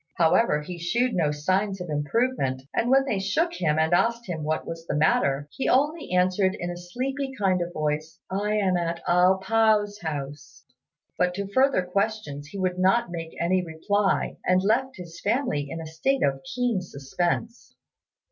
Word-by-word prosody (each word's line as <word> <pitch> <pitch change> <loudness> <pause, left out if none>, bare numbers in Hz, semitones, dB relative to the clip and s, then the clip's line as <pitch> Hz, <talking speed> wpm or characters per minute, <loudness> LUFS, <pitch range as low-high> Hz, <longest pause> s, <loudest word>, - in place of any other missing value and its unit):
However, 165 -1 +3
he 175 +2 -7
shewed 235 +9 0
no 165 -5 +2
signs 190 +7 0
of 180 - -5
improvement; 145 - -1
and 235 - 0
when 270 +1 +5
they 215 -8 -1
shook 315 - 0
him, 155 - 0
and 160 +2 +2
asked 235 +6 +2
him 165 -4 -4
what 155 +1 -1
was 165 0 -7
the - - -1
matter, 145 -2 +2
he 270 - -2
only 295 - +1
answered 185 +1 +2
in 175 0 -3
a - - -5
sleepy 265 +10 -4
kind 190 -4 +1
of 175 0 -3
voice, 155 0 -2
"I 205 +2 -1
am 190 -4 +2
at 170 -1 -3
A 180 +2 +5
pao's 210 0 +2
house;" 145 -2 -6 0.6
but 180 0 +2
to 200 +1 -3
further 260 0 +2
questions 180 -6 -2
he 175 - -9
would 185 -1 -1
not 190 +3 +2
make 165 -2 -6
any 180 +2 +1
reply, 190 +5 0
and 185 +1 +2
left 260 +6 +1
his 175 -3 -10
family 205 - 0
in 165 - -5
a 165 - -6
state 165 +13 0
of 135 -1 +1
keen 245 -6 0
suspense. 175 - -3
180 Hz, 175 wpm, -25 LUFS, 160-220 Hz, 0.6 s, when